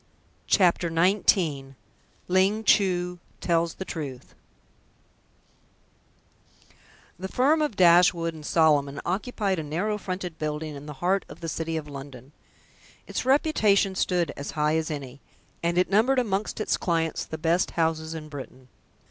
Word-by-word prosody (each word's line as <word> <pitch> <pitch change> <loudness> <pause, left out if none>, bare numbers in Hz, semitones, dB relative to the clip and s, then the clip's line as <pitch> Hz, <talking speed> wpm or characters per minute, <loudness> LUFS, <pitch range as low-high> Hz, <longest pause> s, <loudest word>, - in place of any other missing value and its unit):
CHAPTER 175 -3 +3
XIX 165 -5 +1 0.5
LING 190 +4 +2
CHU 180 -4 +2 0.2
TELLS 170 -1 0
THE 190 - -6
TRUTH 140 -8 -7 2.9
The 190 - -4
firm 285 +9 +2
of 295 -8 -1
Dashwood 170 -2 +4
and 155 -1 -11
Solomon 145 -3 +2
occupied 195 0 -1
a - - -3
narrow 190 +8 -2
fronted 185 -3 -5
building 150 0 -3
in 145 +1 -9
the 150 - -6
heart 190 +1 +2
of - - -12
the 165 - -4
City 165 0 -3
of 150 -1 -5
London. 135 -2 -10 0.7
Its - - -4
reputation 220 -9 +3
stood 175 -4 0
as 140 - -6
high 150 +1 +2
as 160 -1 -1
any, 140 -3 -6 0.4
and 170 +1 0
it 180 0 +2
numbered 230 +7 +3
amongst 215 -4 -1
its 215 - 0
clients 165 -2 -1
the 160 - -7
best 165 +3 +1
houses 160 -1 0
in 155 -1 -7
Britain. 130 -3 -10
170 Hz, 140 wpm, -26 LUFS, 155-190 Hz, 2.9 s, Dashwood